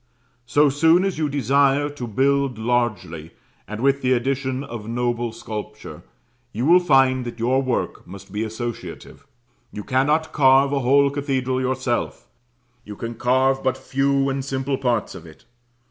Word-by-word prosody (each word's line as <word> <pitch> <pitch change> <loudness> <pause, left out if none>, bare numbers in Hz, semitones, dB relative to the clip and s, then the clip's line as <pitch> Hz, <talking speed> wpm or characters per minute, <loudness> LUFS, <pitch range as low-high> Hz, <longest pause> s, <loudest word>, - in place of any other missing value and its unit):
So 145 +4 +4
soon 160 +6 +3
as 190 -5 -2
you 155 -2 0
desire 140 +1 +2
to 145 -4 -7
build 135 +2 +1
largely, 110 -9 -2 0.3
and 105 +1 -6
with 140 +1 +1
addition 130 +1 0
of 115 -5 -8
noble 120 0 -1
sculpture, 110 -2 -8 0.5
you 115 +4 -3
will 175 +4 +6
find 135 -6 +3
that 120 -1 -7
your 125 +3 +1
work 130 -2 -3
must 95 +1 -12
be 105 +2 -2
associative. 115 +1 -7 0.4
You 105 - -7
cannot 150 +6 +1
carve 135 0 +4
a 140 - +1
whole 140 +2 +3
cathedral 130 -2 -2
yourself 130 0 -2 0.6
you 105 - -9
can 115 +3 -6
carve 130 +3 +1
but 130 0 0
few 135 +1 0
and 135 0 -2
simple 135 0 -3
parts 120 -5 -1
of 90 -3 -11
it. 80 - -17
130 Hz, 150 wpm, -22 LUFS, 120-140 Hz, 0.6 s, will